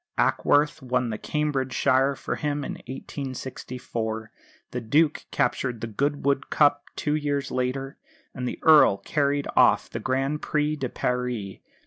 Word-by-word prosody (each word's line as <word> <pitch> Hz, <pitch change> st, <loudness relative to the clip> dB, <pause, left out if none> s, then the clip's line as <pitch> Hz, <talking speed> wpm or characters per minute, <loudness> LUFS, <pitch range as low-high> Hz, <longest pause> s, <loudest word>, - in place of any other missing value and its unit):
Ackworth 145 Hz, +1 st, +2 dB
won 125 Hz, -2 st, 0 dB
the 110 Hz, -, -4 dB
Cambridgeshire 135 Hz, -2 st, +1 dB
for -, -, -4 dB
him, 145 Hz, -1 st, -2 dB
in -, -, -4 dB, 0.2 s
1864; 125 Hz, -5 st, -5 dB, 0.4 s
the 125 Hz, -, -3 dB
Duke 150 Hz, +7 st, +2 dB
captured 125 Hz, -4 st, 0 dB
the -, -, -3 dB
Goodwood 140 Hz, +4 st, 0 dB
Cup 145 Hz, -1 st, +3 dB
two 150 Hz, -, -1 dB
years 145 Hz, -2 st, -1 dB
later; 130 Hz, +2 st, -2 dB, 0.4 s
and 125 Hz, -1 st, -4 dB
the -, -, -4 dB
Earl 155 Hz, -10 st, +7 dB
carried 140 Hz, +6 st, 0 dB
off -, -, +4 dB
the -, -, -4 dB
Grand 135 Hz, +3 st, -1 dB
Prix 150 Hz, 0 st, 0 dB
de 130 Hz, -4 st, -3 dB
Paris. 125 Hz, -7 st, -2 dB
135 Hz, 135 wpm, -25 LUFS, 125-145 Hz, 0.4 s, Earl